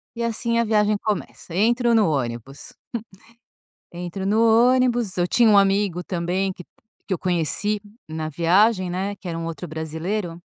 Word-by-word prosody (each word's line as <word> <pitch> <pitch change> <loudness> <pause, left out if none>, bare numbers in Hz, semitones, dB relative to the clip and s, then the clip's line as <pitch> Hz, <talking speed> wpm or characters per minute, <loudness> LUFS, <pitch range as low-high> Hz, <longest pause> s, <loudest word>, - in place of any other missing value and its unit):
e 235 - -3
assim, 230 0 0
a - - +3
viagem 210 -1 +2
começa. 205 -4 -4
Entro 235 +3 +2
no 210 -7 +4
ônibus 125 -1 -4 1.2
entro 180 +2 -5
no 215 +3 +3 0.3
ônibus. 240 -6 +1
Eu 175 -1 +1
tinha 235 +4 +4
um 205 - +6
amigo 195 -2 +1
também 185 +2 -1
que, 180 - -11 0.4
que 190 - -1
eu - - -5
conheci 180 +4 0 0.3
na 155 0 -4
viagem, 185 +4 +2
né, 195 +3 -3
que 195 - -14
era 165 - -3
um 165 - -4
outro 160 -4 -6
brasileiro 165 +3 -4
190 Hz, 160 wpm, -23 LUFS, 165-215 Hz, 1.2 s, um